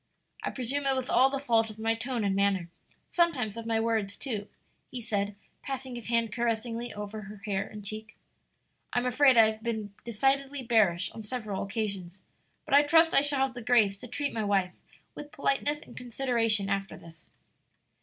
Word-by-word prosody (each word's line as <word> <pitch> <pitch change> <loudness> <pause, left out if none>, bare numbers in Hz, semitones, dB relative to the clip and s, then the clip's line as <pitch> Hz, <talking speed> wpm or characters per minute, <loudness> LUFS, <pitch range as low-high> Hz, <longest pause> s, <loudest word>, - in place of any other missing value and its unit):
"I - - -2
presume 275 +3 -2
it 270 - +4
was 260 -1 -3
all 265 +1 +5
the 275 - -2
fault 230 -5 +2
of 215 - -10
my 225 +1 +1
tone 235 0 -3
and 195 -1 +1
manner, 195 -3 +1 0.4
sometimes 280 - +1
of 230 0 -6
my 225 -1 +1
words, 220 -3 0
too," 215 -6 -3 0.4
he 255 - -6
said, 205 -3 -2 0.3
passing 265 -1 -5
his 240 -3 -7
hand 230 -2 +1
caressingly 235 0 -2
over 210 +1 -6
her 200 0 -11
hair 195 -2 -1
and 210 -2 -10
cheek. 215 +1 -7 0.8
"I'm 245 0 +1
afraid 260 0 +5
I've 220 -1 +5
been 220 -3 -3
decidedly 270 +4 0
bearish 210 -7 +2
on 225 - -8
several 215 -3 -4
occasions; 195 -3 -4 0.4
but - - -4
I 285 - +9
trust 325 +2 +5
I - - +7
shall 285 -1 +2
have 265 - -6
the 245 - -7
grace 220 -5 +3
to 250 - -9
treat 285 +4 -2
my 220 - -1
wife 195 -3 +1 0.4
with 295 0 -9
politeness 290 +2 0
and - - -14
consideration 235 -4 0
after 195 -1 -2
this." 165 -1 -15
225 Hz, 185 wpm, -29 LUFS, 205-260 Hz, 0.8 s, I